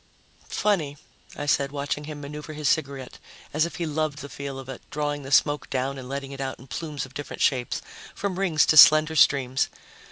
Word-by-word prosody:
"Funny," 160 -9 0 0.4
I 145 - -3
said, 140 -1 +1
watching 145 +1 -3
him 150 -1 -7
maneuver 150 +2 -7
his 150 -1 -2
cigarette 140 -4 -1 0.3
as 155 +3 +2
if - - -10
he 170 - -2
loved 155 -1 -1
the 145 -1 -8
feel 140 -1 -6
of 135 -1 -8
it, 130 -2 -7
drawing 145 0 -2
the 135 0 -9
smoke 145 +1 +3
down 135 +1 -2
and 125 -1 -9
letting 140 0 -4
it 135 0 -7
out 130 -1 -3
in 130 - -14
plumes 145 0 -5
of 135 - -16
different 145 +1 -4
shapes, 125 -3 0 0.3
from 195 -2 -3
rings 170 -6 +3
to 155 - +3
slender 155 +1 +8
streams. 130 -4 +3
145 Hz, 200 wpm, -25 LUFS, 135-155 Hz, 0.4 s, slender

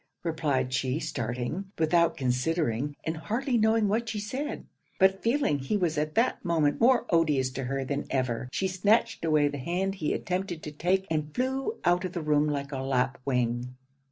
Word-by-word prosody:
replied 145 -6 0
she, 130 +2 0
starting, 125 - -3
without 170 +1 +3
considering 135 +1 0
and 160 0 -2
hardly 240 - -1
knowing 220 -1 +3
what 225 +3 0
she 210 - -3
said; 265 +9 -4 0.3
but 190 0 +4
feeling 230 - +1
he 135 +10 -1
was 175 -5 0
at 155 0 -2
that 230 +3 +1
moment 160 -3 +1
more 245 0 +5
odious 150 -6 +2
to 130 0 -4
her 135 +1 -2
than 140 +2 -3
ever, 130 -2 -1
she 190 - 0
snatched 205 +4 +2
away 155 -2 +3
the 145 0 -4
hand 180 +7 -1
he 160 -6 -2
attempted 180 -3 -3
to 150 - -5
take, 180 +5 0
and 150 -1 -2
flew 265 - -1
out 175 +1 +3
of 185 -1 -4
the 175 - -3
room 150 0 +3
like 140 -1 -2
a 135 - -3
lapwing. 125 -2 -1
160 Hz, 180 wpm, -28 LUFS, 135-195 Hz, 0.3 s, more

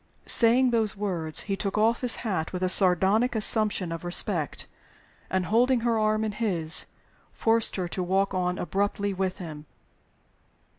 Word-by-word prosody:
Saying 245 +2 +4
those 220 -4 -1
words, 170 -7 -2
he 195 - -4
took 195 +1 -4
off 225 +2 +1
his 250 -1 +3
hat 180 -7 -3
with 185 0 -5
a 185 - 0
sardonic 195 +6 +3
assumption 210 -4 +3
of 165 +1 -7
respect; 175 -3 -2 0.6
and, 185 -1 -2
holding 240 +4 +1
her 230 -1 0
arm 215 0 0
in 215 - -3
his, 180 -8 0 0.5
forced 225 0 0
her 185 -2 -3
to 185 - -4
walk 195 +2 -1
on 180 -1 -2
abruptly 200 +3 -3
with 190 0 -3
him. 155 -5 -10
195 Hz, 155 wpm, -25 LUFS, 180-220 Hz, 0.6 s, Saying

